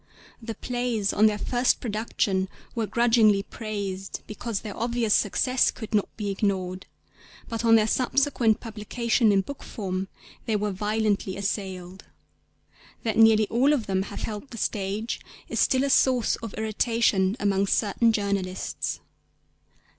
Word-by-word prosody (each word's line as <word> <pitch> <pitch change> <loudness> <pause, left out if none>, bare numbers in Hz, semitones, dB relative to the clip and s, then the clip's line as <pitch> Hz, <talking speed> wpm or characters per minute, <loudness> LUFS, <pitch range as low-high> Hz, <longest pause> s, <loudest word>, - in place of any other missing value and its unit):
The 225 -1 -6
plays 240 -3 -1
on 215 +1 +5
their 210 -1 0
first 245 +4 +1
production 205 -4 -1 0.2
were 225 -3 -1
grudgingly 225 -4 +4
praised 200 -4 -5
because 215 -1 -4
their 210 -3 -7
obvious 235 -2 0
success 255 +5 +2
could 220 -1 -7
not 205 -2 +2
be 205 -2 -2
ignored; 190 -2 -2 0.6
but 230 0 -4
on 225 -1 +6
their 215 -1 +5
subsequent 250 -1 +2
publication 225 +1 0
in 195 -1 +4
book 280 +8 -8
form 190 -3 -4 0.4
they 220 - +1
were 210 0 0
violently 205 -1 -1
assailed. 190 -2 -4 1.0
That 220 -2 -1
nearly 220 -1 +6
all 265 +6 +3
of 250 -7 0
them 190 -1 0
have - - -6
held 215 +5 -5
the 230 - -9
stage 210 +2 -2 0.3
is - - -3
still 260 0 +3
a 280 - 0
source 255 -3 +3
of 225 -2 -8
irritation 220 -2 +1
among 200 -1 +1
certain 225 +3 +2
journalists. 200 -3 -2
215 Hz, 140 wpm, -26 LUFS, 200-230 Hz, 1.0 s, on